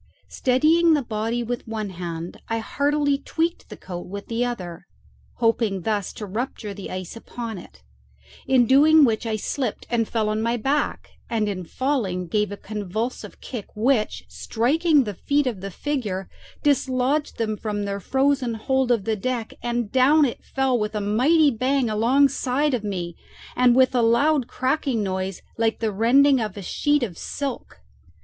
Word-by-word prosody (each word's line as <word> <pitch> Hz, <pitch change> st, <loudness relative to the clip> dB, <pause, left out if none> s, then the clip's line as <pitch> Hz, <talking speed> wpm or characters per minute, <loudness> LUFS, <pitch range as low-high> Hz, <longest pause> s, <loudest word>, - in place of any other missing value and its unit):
Steadying 315 Hz, +6 st, +3 dB
the 290 Hz, -, 0 dB
body 225 Hz, +1 st, -2 dB
with 240 Hz, +1 st, -4 dB
one 215 Hz, -3 st, -4 dB
hand, 170 Hz, -1 st, -6 dB
I 225 Hz, -, -1 dB
heartily 285 Hz, +4 st, 0 dB
tweaked 330 Hz, +4 st, -2 dB
the -, -, -9 dB
coat 175 Hz, -1 st, -7 dB
with 200 Hz, +2 st, -7 dB
the 230 Hz, +1 st, 0 dB
other, 180 Hz, -8 st, -5 dB, 0.5 s
hoping 225 Hz, -4 st, +1 dB
thus 205 Hz, -2 st, -1 dB
to 210 Hz, -, -6 dB
rupture 215 Hz, 0 st, -4 dB
the 200 Hz, -1 st, -8 dB
ice 185 Hz, +1 st, -6 dB
upon 230 Hz, -2 st, -6 dB
it; 65 Hz, -, -15 dB, 0.6 s
in 255 Hz, -2 st, +5 dB
doing 295 Hz, +4 st, +6 dB
which 230 Hz, -1 st, 0 dB
I 220 Hz, -, 0 dB
slipped 235 Hz, +2 st, -3 dB
and 230 Hz, -2 st, +1 dB
fell 220 Hz, -2 st, 0 dB
on 215 Hz, +1 st, -1 dB
my 235 Hz, +1 st, 0 dB
back, 275 Hz, +6 st, -1 dB, 0.2 s
and 220 Hz, -3 st, 0 dB
in 185 Hz, -3 st, -3 dB
falling 210 Hz, -, -1 dB
gave 210 Hz, +4 st, 0 dB
a 205 Hz, -, -5 dB
convulsive 215 Hz, +4 st, -5 dB
kick 235 Hz, -6 st, -6 dB
which, 225 Hz, 0 st, +1 dB
striking 295 Hz, +6 st, +2 dB
the 210 Hz, -3 st, -4 dB
feet 285 Hz, +9 st, 0 dB
of 230 Hz, -7 st, -2 dB
the 195 Hz, -, -5 dB
figure, 205 Hz, -5 st, -3 dB, 0.4 s
dislodged 275 Hz, +1 st, +1 dB
them 220 Hz, -2 st, -1 dB
from 210 Hz, -1 st, -3 dB
their 200 Hz, 0 st, -3 dB
frozen 265 Hz, +1 st, +1 dB
hold 265 Hz, +3 st, 0 dB
of 235 Hz, -5 st, +2 dB
the 220 Hz, -, +1 dB
deck, 235 Hz, +1 st, -3 dB
and 240 Hz, -2 st, -2 dB
down 280 Hz, +4 st, +5 dB
it 245 Hz, -, -4 dB
fell 265 Hz, -2 st, 0 dB
with 210 Hz, 0 st, -2 dB
a -, -, 0 dB
mighty 270 Hz, +10 st, +3 dB
bang 255 Hz, 0 st, +1 dB
alongside 270 Hz, +4 st, +2 dB
of 240 Hz, -4 st, -1 dB
me, 180 Hz, -5 st, -4 dB, 0.4 s
and 250 Hz, -1 st, +5 dB
with 260 Hz, 0 st, +4 dB
a 245 Hz, -, +3 dB
loud 250 Hz, +4 st, +3 dB
crackling 260 Hz, -4 st, 0 dB
noise, 190 Hz, -1 st, -3 dB, 0.2 s
like 225 Hz, -1 st, +1 dB
the 220 Hz, -2 st, -1 dB
rending 265 Hz, +6 st, +5 dB
of 210 Hz, -2 st, -4 dB
a 200 Hz, -, -6 dB
sheet 290 Hz, +8 st, +1 dB
of 185 Hz, -8 st, -5 dB
silk. 275 Hz, -, -5 dB
235 Hz, 170 wpm, -23 LUFS, 210-270 Hz, 0.6 s, doing